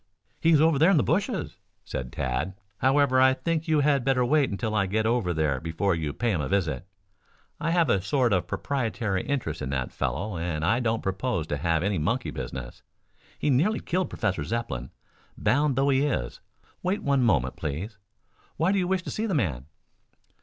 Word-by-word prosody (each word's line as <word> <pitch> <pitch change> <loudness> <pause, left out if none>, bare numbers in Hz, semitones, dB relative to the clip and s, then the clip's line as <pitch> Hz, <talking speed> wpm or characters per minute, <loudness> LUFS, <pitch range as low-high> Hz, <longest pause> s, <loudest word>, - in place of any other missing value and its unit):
"He 165 - +2
is 160 -3 +6
over 160 -2 +4
there 160 +4 +6
in 195 - +5
the 140 - +4
bushes," 180 - -1 0.3
said 60 0 -5
Tad. 70 +7 -2 0.2
"However, 130 0 +4
I 130 0 +5
think 165 +2 -2
you 155 -2 +3
had 140 -2 +2
better 125 -1 +2
wait 145 +2 +3
until 110 +2 -3
I 100 -3 +2
get 110 +3 0
over 115 -5 +1
there 75 -5 0
before 85 +4 0
you 80 -3 -2
pay 120 +9 -1
him 85 -7 0
a 70 - -2
visit. 90 -5 -1 0.7
I 165 - -1
have 170 -1 +3
a 95 - +2
sort 120 +4 +1
of 90 -2 +1
proprietary 115 -8 -1
interest 130 - -3
in 65 - -3
that 65 -2 -2
fellow 75 - -2
and 80 -2 -2
I 115 +6 +3
don't 115 -2 0
propose 95 -2 -1
to 75 - -1
have 85 +1 0
any 100 -3 0
monkey 115 +12 -1
business. - - -6 0.6
He 150 - +1
nearly 175 +12 +2
killed 185 +1 -1
Professor 90 -6 -1
Zepplin, 75 - -3 0.5
bound 140 +6 +2
though 135 +2 +2
he 135 0 +3
is. 125 - -2 0.4
Wait 190 +3 -1
one 140 -2 +2
moment, 70 - +2
please. 95 +9 -5 0.6
Why 165 +4 +2
do 200 - +2
you 180 - 0
wish 190 0 0
to - - -5
see 220 +1 -2
the 190 - -1
man?" 75 - -1
115 Hz, 195 wpm, -26 LUFS, -, 0.7 s, is